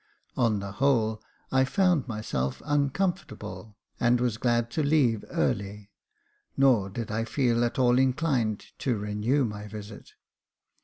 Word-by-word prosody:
On 115 Hz, -4 st, +2 dB
the 100 Hz, 0 st, -5 dB
whole, 110 Hz, -2 st, +1 dB, 0.3 s
I 130 Hz, 0 st, +4 dB
found 180 Hz, -1 st, +2 dB
myself 105 Hz, -, -3 dB
uncomfortable, 135 Hz, -, -2 dB, 0.2 s
and 120 Hz, 0 st, +3 dB
was 120 Hz, -3 st, 0 dB
glad 120 Hz, -1 st, +1 dB
to 155 Hz, -, 0 dB
leave 140 Hz, -7 st, +2 dB
early, 100 Hz, +1 st, -2 dB, 0.7 s
nor 125 Hz, -8 st, +4 dB
did 110 Hz, +2 st, -5 dB
I 110 Hz, +1 st, -1 dB
feel 120 Hz, -1 st, +1 dB
at 120 Hz, -, -1 dB
all 125 Hz, -1 st, +4 dB
inclined 130 Hz, -5 st, +1 dB
to 125 Hz, -5 st, 0 dB
renew 105 Hz, +7 st, 0 dB
my 105 Hz, -2 st, -6 dB
visit. 105 Hz, 0 st, -10 dB
120 Hz, 135 wpm, -27 LUFS, 105-135 Hz, 0.7 s, I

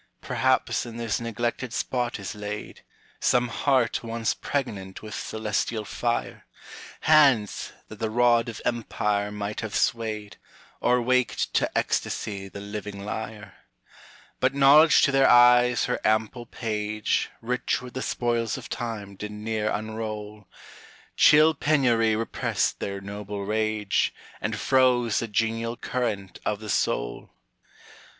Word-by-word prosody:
Perhaps -, -, +1 dB
in 115 Hz, -1 st, -8 dB
this 115 Hz, -3 st, -1 dB
neglected 120 Hz, +2 st, -3 dB
spot 125 Hz, -1 st, -1 dB
is 100 Hz, +2 st, -5 dB
laid; 105 Hz, 0 st, -7 dB, 0.4 s
Some 125 Hz, -1 st, +2 dB
heart 130 Hz, -1 st, +1 dB
once 115 Hz, 0 st, -1 dB
pregnant 100 Hz, -10 st, -4 dB
with 110 Hz, 0 st, -8 dB
celestial 110 Hz, 0 st, -2 dB
fire; 120 Hz, +3 st, -3 dB, 0.5 s
Hands, 140 Hz, -9 st, +4 dB, 0.2 s
that 110 Hz, -, -11 dB
the 110 Hz, -, -1 dB
rod 120 Hz, 0 st, +3 dB
of 115 Hz, -, -8 dB
empire 105 Hz, -3 st, -1 dB
might 105 Hz, 0 st, -4 dB
have 110 Hz, -2 st, -5 dB
swayed, 110 Hz, -3 st, -1 dB, 0.4 s
Or 125 Hz, +1 st, +3 dB
waked 125 Hz, 0 st, +1 dB
to -, -, +2 dB
ecstasy 100 Hz, -2 st, -2 dB
the 100 Hz, -, -9 dB
living 100 Hz, -1 st, -6 dB
lyre; 105 Hz, -1 st, -6 dB, 0.9 s
But 130 Hz, +1 st, +1 dB
knowledge 145 Hz, +3 st, +7 dB
to 140 Hz, -, +4 dB
their 135 Hz, 0 st, +4 dB
eyes 120 Hz, 0 st, +6 dB
her -, -, -1 dB
ample 110 Hz, +2 st, 0 dB
page, 105 Hz, -2 st, -2 dB
Rich 125 Hz, +1 st, -1 dB
with 125 Hz, -, -9 dB
the 130 Hz, -, -4 dB
spoils 120 Hz, -3 st, -1 dB
of -, -, -9 dB
time, 105 Hz, -4 st, -5 dB
did 105 Hz, +2 st, -6 dB
ne'er 105 Hz, 0 st, -2 dB
unroll; 105 Hz, -1 st, -5 dB, 0.7 s
Chill 155 Hz, +2 st, +6 dB
penury 125 Hz, -7 st, +2 dB
repressed 115 Hz, +1 st, -1 dB
their 100 Hz, 0 st, -4 dB
noble 100 Hz, 0 st, -6 dB
rage, 110 Hz, -1 st, 0 dB, 0.3 s
And -, -, -2 dB
froze 125 Hz, -4 st, +3 dB
the 115 Hz, -, -3 dB
genial 115 Hz, +2 st, -1 dB
current 110 Hz, -7 st, -3 dB
of 105 Hz, -, -1 dB
the 110 Hz, -1 st, -8 dB
soul. -, -, -1 dB
110 Hz, 130 wpm, -26 LUFS, 105-120 Hz, 0.9 s, knowledge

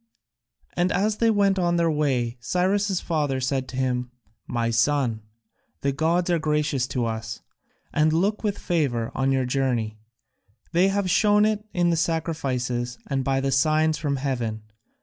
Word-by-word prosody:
And 180 Hz, +2 st, +1 dB
as 210 Hz, +2 st, +1 dB
they 230 Hz, -, +3 dB
went 200 Hz, -3 st, +3 dB
on 175 Hz, -1 st, +1 dB
their 170 Hz, -1 st, +2 dB
way 130 Hz, -6 st, 0 dB
Cyrus' 190 Hz, -, 0 dB
father 145 Hz, -5 st, -1 dB
said 130 Hz, 0 st, -1 dB
to 130 Hz, -, -7 dB
him, 125 Hz, -1 st, -1 dB, 0.4 s
"My 115 Hz, -1 st, -1 dB
son, 115 Hz, -1 st, +1 dB, 0.6 s
the 140 Hz, -, +1 dB
gods 170 Hz, +5 st, +1 dB
are 170 Hz, -, +2 dB
gracious 150 Hz, -4 st, 0 dB
to 125 Hz, -2 st, -1 dB
us, 110 Hz, -1 st, -4 dB, 0.5 s
and 155 Hz, +1 st, +3 dB
look 195 Hz, +8 st, 0 dB
with 205 Hz, -2 st, -1 dB
favour 135 Hz, -10 st, -1 dB
on 135 Hz, 0 st, +1 dB
your 135 Hz, -1 st, +1 dB
journey 125 Hz, -5 st, -1 dB, 0.7 s
they 175 Hz, +3 st, +4 dB
have 195 Hz, 0 st, 0 dB
shown 210 Hz, +3 st, +4 dB
it 215 Hz, -1 st, 0 dB
in 175 Hz, -1 st, +2 dB
the 165 Hz, -, +1 dB
sacrifices, 130 Hz, -7 st, -1 dB
and 135 Hz, -1 st, 0 dB
by 135 Hz, 0 st, +1 dB
their 135 Hz, 0 st, 0 dB
signs 155 Hz, +3 st, +2 dB
from 145 Hz, -2 st, -1 dB
heaven. 120 Hz, -5 st, -3 dB
145 Hz, 160 wpm, -24 LUFS, 125-175 Hz, 0.7 s, they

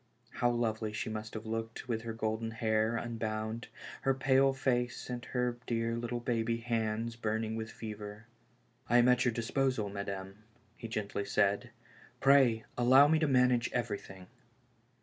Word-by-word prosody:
How 120 Hz, -, +1 dB
lovely 110 Hz, -2 st, -1 dB
she 110 Hz, +1 st, -3 dB
must 110 Hz, 0 st, -6 dB
have 110 Hz, 0 st, -5 dB
looked 115 Hz, +1 st, -4 dB
with 115 Hz, -2 st, -1 dB
her 115 Hz, 0 st, -5 dB
golden 110 Hz, 0 st, -2 dB
hair 110 Hz, 0 st, +1 dB
unbound, 110 Hz, -1 st, -3 dB, 0.3 s
her 135 Hz, 0 st, +2 dB
pale 135 Hz, 0 st, +4 dB
face 125 Hz, -2 st, -1 dB
and 120 Hz, -1 st, -4 dB
her 125 Hz, -1 st, -1 dB
dear 115 Hz, 0 st, 0 dB
little 120 Hz, +1 st, -3 dB
baby 115 Hz, -1 st, 0 dB
hands 115 Hz, -1 st, -2 dB
burning 110 Hz, -1 st, -2 dB
with 110 Hz, 0 st, -4 dB
fever. 105 Hz, 0 st, -8 dB, 0.3 s
'' 125 Hz, 0 st, -34 dB
I 120 Hz, -, +5 dB
am 120 Hz, 0 st, +6 dB
at 125 Hz, 0 st, +4 dB
your 120 Hz, -, +3 dB
disposal, 115 Hz, -1 st, 0 dB
madame," 100 Hz, 0 st, -6 dB, 0.3 s
he 115 Hz, -, -7 dB
gently 105 Hz, -2 st, -3 dB
said. 100 Hz, -1 st, +1 dB, 0.5 s
Pray 135 Hz, -5 st, +5 dB, 0.2 s
allow 130 Hz, +4 st, +7 dB
me 160 Hz, +1 st, +3 dB
to 155 Hz, -, +2 dB
manage 125 Hz, -2 st, +3 dB
everything." 105 Hz, -5 st, -4 dB
115 Hz, 155 wpm, -32 LUFS, 110-120 Hz, 0.5 s, allow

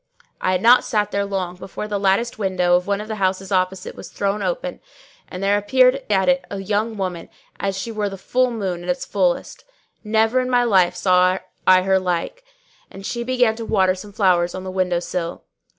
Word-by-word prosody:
I 185 Hz, -, +1 dB
had 185 Hz, -, -1 dB
not 245 Hz, +2 st, +7 dB
sat 210 Hz, -2 st, -1 dB
there 200 Hz, 0 st, 0 dB
long 185 Hz, -3 st, -3 dB
before 190 Hz, +3 st, -7 dB
the 205 Hz, -1 st, -2 dB
latticed 200 Hz, +4 st, +1 dB
window 185 Hz, -3 st, +2 dB
of 180 Hz, +1 st, 0 dB
one 200 Hz, 0 st, 0 dB
of 215 Hz, -, -8 dB
the 220 Hz, -1 st, -4 dB
houses 190 Hz, 0 st, -1 dB
opposite 185 Hz, 0 st, -1 dB
was -, -, -10 dB
thrown 200 Hz, +1 st, -2 dB
open, -, -, -3 dB, 0.5 s
and 180 Hz, +1 st, -7 dB
there 200 Hz, +1 st, +3 dB
appeared 255 Hz, +5 st, +3 dB
at 190 Hz, -2 st, +2 dB
it 270 Hz, 0 st, +3 dB
a 200 Hz, -, -5 dB
young 210 Hz, +3 st, -1 dB
lady, 180 Hz, -3 st, -4 dB, 0.3 s
as 195 Hz, -1 st, -2 dB
she 230 Hz, -, -4 dB
were 210 Hz, -2 st, -2 dB
the 195 Hz, -, -8 dB
full 255 Hz, +6 st, +1 dB
moon 195 Hz, -7 st, -3 dB
at 175 Hz, -, -7 dB
its 180 Hz, -, -1 dB
fullest; 185 Hz, -4 st, -1 dB, 0.4 s
never 220 Hz, +3 st, +2 dB
in 255 Hz, 0 st, -1 dB
my 245 Hz, -1 st, +3 dB
life 185 Hz, -6 st, +3 dB
saw 185 Hz, 0 st, +3 dB, 0.3 s
I 185 Hz, 0 st, +6 dB
her 190 Hz, 0 st, +3 dB
like; 180 Hz, -, -3 dB, 0.5 s
and 195 Hz, 0 st, -11 dB
she 235 Hz, +2 st, -3 dB
began 245 Hz, -2 st, +2 dB
to 230 Hz, -, -5 dB
water 190 Hz, -4 st, +2 dB
some 190 Hz, +2 st, -10 dB
flowers 180 Hz, -3 st, +2 dB
on 185 Hz, -, -6 dB
the 190 Hz, -, -5 dB
window 185 Hz, -2 st, 0 dB
sill. 175 Hz, -1 st, -4 dB
195 Hz, 210 wpm, -21 LUFS, 185-220 Hz, 0.5 s, not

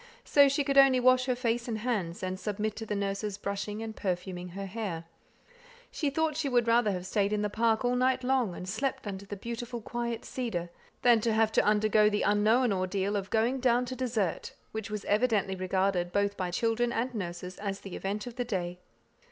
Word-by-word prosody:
So 285 Hz, -1 st, +5 dB
she 280 Hz, +1 st, +1 dB
could 275 Hz, 0 st, +4 dB
only 270 Hz, -2 st, +6 dB
wash 255 Hz, 0 st, +4 dB
her 255 Hz, -1 st, +1 dB
face 240 Hz, -1 st, -1 dB
and 225 Hz, -2 st, -2 dB
hands, 210 Hz, -8 st, -2 dB
and 185 Hz, 0 st, -3 dB
submit 210 Hz, +1 st, -2 dB
to 225 Hz, -, -6 dB
the 210 Hz, -, -2 dB
nurse's 200 Hz, 0 st, -2 dB
brushing 205 Hz, +2 st, -4 dB
and 220 Hz, -1 st, -6 dB
perfuming 180 Hz, -1 st, -3 dB
her 195 Hz, +3 st, -6 dB
hair. 195 Hz, -5 st, -4 dB, 0.9 s
She 295 Hz, -, -1 dB
thought 315 Hz, +1 st, 0 dB
she 300 Hz, -2 st, -1 dB
would 240 Hz, -2 st, +2 dB
rather 230 Hz, -2 st, +4 dB
have 180 Hz, -1 st, -4 dB
stayed 200 Hz, +1 st, +1 dB
in 210 Hz, 0 st, 0 dB
the 210 Hz, -, -1 dB
park 225 Hz, +2 st, +1 dB
all 245 Hz, 0 st, +2 dB
night 255 Hz, +1 st, +2 dB
long, 250 Hz, -8 st, +1 dB
and 180 Hz, -, -7 dB
slept 235 Hz, +8 st, -2 dB
under 200 Hz, -1 st, -6 dB
the 205 Hz, -, -5 dB
beautiful 235 Hz, +3 st, -5 dB
quiet 235 Hz, +1 st, -4 dB
cedar, 180 Hz, -9 st, -3 dB, 0.3 s
than 235 Hz, -2 st, +6 dB
have 220 Hz, -1 st, +2 dB
to -, -, +3 dB
undergo 210 Hz, 0 st, +4 dB
the 210 Hz, 0 st, 0 dB
unknown 215 Hz, +3 st, +3 dB
ordeal 190 Hz, +2 st, -1 dB
of 195 Hz, -1 st, -2 dB
"going 235 Hz, +4 st, +1 dB
down 250 Hz, -1 st, +3 dB
to 255 Hz, +1 st, -5 dB
dessert," 225 Hz, -9 st, -2 dB, 0.2 s
which 220 Hz, 0 st, -5 dB
was 210 Hz, -1 st, -4 dB
evidently 210 Hz, -3 st, +2 dB
regarded 185 Hz, -1 st, 0 dB
both 200 Hz, +1 st, +1 dB
by 185 Hz, -2 st, -2 dB
children 230 Hz, +5 st, 0 dB
and 240 Hz, +2 st, -1 dB
nurses 180 Hz, -3 st, -5 dB
as 200 Hz, -1 st, -4 dB
the 195 Hz, -, -7 dB
event 205 Hz, +2 st, -3 dB
of 245 Hz, 0 st, -8 dB
the 245 Hz, -, 0 dB
day. 180 Hz, -5 st, -3 dB
215 Hz, 205 wpm, -29 LUFS, 195-240 Hz, 0.9 s, only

